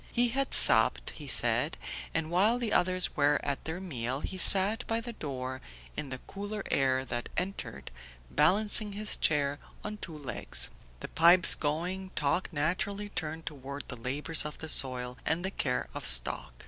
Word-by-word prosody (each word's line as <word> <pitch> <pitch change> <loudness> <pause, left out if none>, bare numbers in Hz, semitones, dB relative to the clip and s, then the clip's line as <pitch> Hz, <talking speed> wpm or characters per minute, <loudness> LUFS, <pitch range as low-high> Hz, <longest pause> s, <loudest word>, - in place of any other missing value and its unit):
He 240 0 +2
had 270 +3 -1
supped, - - +6
he 150 - -11
said, 120 +4 +1 0.3
and 160 0 -4
while 205 +7 +2
the 235 -3 -3
others 185 0 +1
were 145 +1 +1
at 140 -1 -4
their 160 +3 -5
meal 130 -7 -5
he 190 - -6
sat 200 +7 +7
by 225 0 -1
the 235 +1 -8
door 130 - -7 0.3
in 140 - -6
the 130 - -6
cooler 205 +1 -7
air 130 -1 0
that 120 -2 -5
entered, 180 - -6 0.4
balancing 205 +6 +3
his 210 +1 0
chair 145 -1 0 0.2
on 210 0 -7
two 165 -6 -9
legs. 130 -7 0 0.3
The - - -7
pipes 170 +2 +5
going, 175 +6 -4
talk 150 +7 -2
naturally 190 +7 -3
turned 160 -3 -6
toward 140 -1 -7
the 125 - -4
labours 140 +7 -2
of 150 - -8
the 160 - -8
soil, 125 -3 +1
and 165 +6 -2
the 190 - -3
care 125 -9 -3
of - - -8
stock. - - +2
160 Hz, 170 wpm, -28 LUFS, 135-195 Hz, 0.4 s, sat